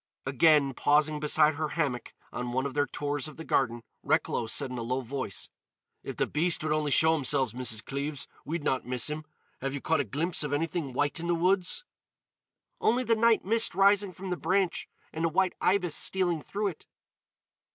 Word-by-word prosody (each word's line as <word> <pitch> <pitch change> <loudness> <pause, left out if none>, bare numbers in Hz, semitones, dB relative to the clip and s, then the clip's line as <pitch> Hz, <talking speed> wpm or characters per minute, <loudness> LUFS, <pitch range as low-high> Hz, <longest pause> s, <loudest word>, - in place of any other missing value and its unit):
Again, 140 +1 +4
pausing 150 +3 +2
beside 150 +1 +3
her 155 +1 -2
hammock 130 -7 -2 0.2
on 125 -1 -4
one 130 +1 0
of 140 - -3
their 145 -1 +1
tours 145 +2 -3
of 155 - -11
the 160 - -7
garden, 120 -6 0 0.2
Recklow 115 - 0
said 125 +3 -1
in 125 - -4
a - - -3
low 125 +3 -2
voice: 130 -4 -4 0.5
"If - - -7
the - - +2
beast 160 +2 +1
would 155 -1 0
only 155 -1 0
show 160 +3 +5
himself, 135 -4 +1
Mrs. 115 -3 -2
Cleves, 140 +1 -4 0.2
we'd 160 0 -4
not 130 -3 0
miss 125 +3 0
him. 155 +1 -5 0.3
Have 135 +1 -3
you - - -3
caught 160 +3 +1
a - - +2
glimpse 155 - 0
of 145 -1 -3
anything 155 -2 -2
white 145 +5 0
in 170 - -4
the 175 - +2
woods?" 185 - +1 1.0
"Only 245 +3 +2
the 230 -2 +2
night 225 -2 +3
mist 225 -1 +3
rising 200 0 +4
from 185 +2 -7
the 180 - -1
branch 190 -1 0 0.2
and 160 - -3
a 165 - +2
white 185 +3 +1
ibis 180 -3 +2
stealing 175 -3 0
through 205 +4 -2
it." 165 - -12
150 Hz, 195 wpm, -28 LUFS, 135-175 Hz, 1.0 s, show